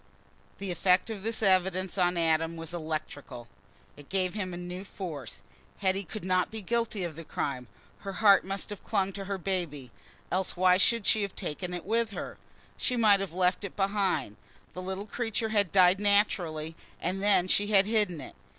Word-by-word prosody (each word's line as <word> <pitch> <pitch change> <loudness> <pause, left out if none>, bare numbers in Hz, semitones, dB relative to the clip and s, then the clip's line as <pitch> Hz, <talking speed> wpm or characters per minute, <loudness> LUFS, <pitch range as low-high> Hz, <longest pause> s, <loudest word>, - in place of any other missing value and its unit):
The 195 -2 -4
effect 180 +4 +2
of 210 -3 -5
this 225 +2 -2
evidence 185 -1 +2
on 180 -2 +2
Adam 165 0 +1
was 165 0 -4
electrical; 155 -6 -5 0.5
it 145 -1 -15
gave 185 -2 0
him 200 -3 -3 0.2
new 180 +2 -6
force. 165 - -7 0.3
Hetty 195 0 0
could 190 +3 -7
not 185 -1 +2
be 220 -2 -7
guilty 230 -2 -1
of 170 -3 -4
the 165 - -8
crime—her 140 - -6
heart 200 0 +6
must 195 +2 -3
have 205 - -7
clung 195 -2 0
to 195 0 -6
her 200 0 -2
baby—else 175 0 -4
why 180 0 +5
should 230 +2 +2
she 215 - +3
have 200 -2 -3
taken 180 +4 -4
it 175 -1 -5
with 230 +2 +1
her? - - -6 0.4
She 250 - -1
might 210 -4 +5
have 195 -3 -3
left 180 +3 +1
it 200 - -6
behind. 195 - 0 0.4
The 185 - -6
little 190 +2 -4
creature 225 0 -2
had 205 -4 +2
died 185 0 +5
naturally, 175 -6 +1 0.2
and 185 +3 -2
then 200 -3 +4
she 205 +2 +2
had 200 -2 +5
hidden 210 -6 +1
it. - - -10
190 Hz, 180 wpm, -29 LUFS, 175-200 Hz, 0.5 s, heart